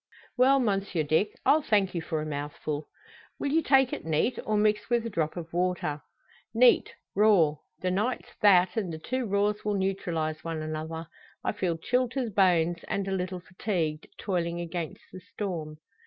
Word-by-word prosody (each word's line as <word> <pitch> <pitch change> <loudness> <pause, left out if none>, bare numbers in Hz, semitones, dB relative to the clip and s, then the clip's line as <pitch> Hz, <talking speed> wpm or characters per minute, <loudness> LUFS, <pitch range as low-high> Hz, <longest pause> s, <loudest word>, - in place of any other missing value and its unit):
"Well, 265 +2 +5
Monsieur 195 -8 0
Dick; 160 +8 +2
I'll 310 - +5
thank 205 -8 +2
you 170 - -2
for 160 -2 -2
a - - -5
mouthful." 145 0 -4 0.5
"Will 280 - -1
you 325 +2 +3
take 270 -4 +4
it - - -4
neat, 160 +10 0
or 215 -1 +2
mixed 210 +1 +2
wi' 240 - +4
a 230 0 -3
drop 160 -2 -1
o' 170 - -4
water?" 175 -4 -1 0.5
"Neat 245 +1 +5 0.2
raw. 190 -8 +4 0.2
The 185 - 0
night's 215 +7 -1
that, 190 -2 +5
and 195 -6 -1
the 160 - -5
two 255 +9 -3
raws 205 +1 +1
will 210 -1 0
neutralise 170 -5 -2
one 165 -2 -3
another. 160 +1 -4 0.4
I - - +1
feel 180 -5 -1
chilled 250 +7 0
to 265 -2 -1
the 225 - -5
bones, 175 -3 +3
and 195 -1 -2
a - - -2
little 185 -1 -2
fatigued, 175 -5 -3
toiling 175 -3 -2
against 170 -2 -5
the 185 - -9
storm." 170 -5 -5
185 Hz, 180 wpm, -28 LUFS, 160-210 Hz, 0.5 s, Well